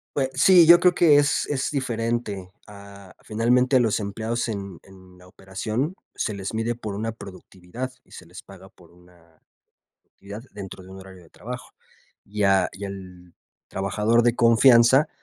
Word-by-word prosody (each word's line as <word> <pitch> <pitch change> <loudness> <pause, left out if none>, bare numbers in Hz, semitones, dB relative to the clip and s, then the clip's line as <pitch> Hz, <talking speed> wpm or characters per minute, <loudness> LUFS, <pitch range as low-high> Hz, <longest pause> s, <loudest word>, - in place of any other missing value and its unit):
Pue 135 -2 0
sí, 180 -3 +6
yo 170 +1 +8
creo 180 -1 +3
que 155 -4 +5
es 145 0 +1
es 135 -2 -2
diferente 115 -7 -3 0.2
a 100 -1 -14
finalmente, 125 +4 +1
a - - +6
los 115 -3 +1
empleados 110 +4 -4
en 100 -5 -6
en 95 -1 -18
la 90 0 -18
operación 110 - -5 0.2
se 110 - -3
les 100 0 -6
mide 115 +2 -2
por 105 -4 -7
una 110 +2 -3
productividad 100 +3 -9
y - - -29
se 90 - -12
les 90 +3 -12
paga 95 -1 -15
por 85 -3 -22
una 85 -2 -24 0.6
productividad 100 +3 -12
dentro 95 -2 -9
de 90 - -15
un 95 - -11
horario 95 -1 -14
de 80 - -21
trabajo. 125 +3 -9 0.6
Y 105 +1 -3
a 95 -2 +3
y 100 - -9
al 90 -3 -10 0.3
trabajador 105 +4 0
de 120 0 +2
confianza 120 +4 +5
105 Hz, 170 wpm, -23 LUFS, 95-120 Hz, 0.6 s, yo